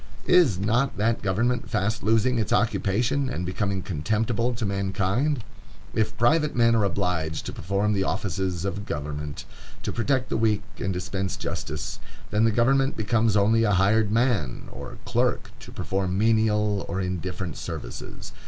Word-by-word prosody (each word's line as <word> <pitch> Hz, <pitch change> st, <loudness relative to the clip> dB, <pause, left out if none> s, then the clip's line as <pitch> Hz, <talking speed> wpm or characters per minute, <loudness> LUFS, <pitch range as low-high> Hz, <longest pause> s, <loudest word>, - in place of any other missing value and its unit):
Is 170 Hz, -, +5 dB
not 110 Hz, +8 st, +1 dB
that 115 Hz, +3 st, +1 dB
government 115 Hz, +5 st, 0 dB
fast 110 Hz, +3 st, 0 dB
losing 115 Hz, +3 st, +2 dB
its 110 Hz, -, -1 dB
occupation, 120 Hz, +6 st, +1 dB
and 90 Hz, -8 st, -3 dB
becoming 95 Hz, +1 st, -1 dB
contemptible 110 Hz, +8 st, 0 dB
to 115 Hz, -1 st, -2 dB
mankind? 100 Hz, +7 st, 0 dB, 0.5 s
If 110 Hz, -1 st, 0 dB
private 150 Hz, +6 st, +3 dB
men 115 Hz, -1 st, +4 dB
are 110 Hz, -, +3 dB
obliged 90 Hz, -5 st, -1 dB
to -, -, -5 dB
perform 100 Hz, +3 st, 0 dB
the 95 Hz, -1 st, +1 dB
offices 95 Hz, -3 st, -2 dB
of 100 Hz, +1 st, -3 dB
government, 75 Hz, 0 st, -4 dB, 0.4 s
to -, -, -2 dB
protect 130 Hz, +2 st, 0 dB
the -, -, 0 dB
weak 110 Hz, -2 st, +2 dB, 0.2 s
and 95 Hz, -, -1 dB
dispense 95 Hz, +1 st, -3 dB
justice, 75 Hz, 0 st, -4 dB, 0.3 s
then 105 Hz, +2 st, +3 dB
the 115 Hz, -, +4 dB
government 135 Hz, +5 st, +2 dB
becomes 110 Hz, 0 st, +2 dB
only 110 Hz, +3 st, +4 dB
a 105 Hz, -2 st, +3 dB
hired 100 Hz, +3 st, +3 dB
man, 110 Hz, -, 0 dB
or -, -, -8 dB
clerk, -, -, 0 dB
to -, -, -11 dB
perform 95 Hz, -1 st, -2 dB
menial 105 Hz, -2 st, +2 dB
or 95 Hz, -, -2 dB
indifferent 90 Hz, -2 st, -3 dB
services. -, -, -7 dB
105 Hz, 155 wpm, -25 LUFS, 95-115 Hz, 0.5 s, Is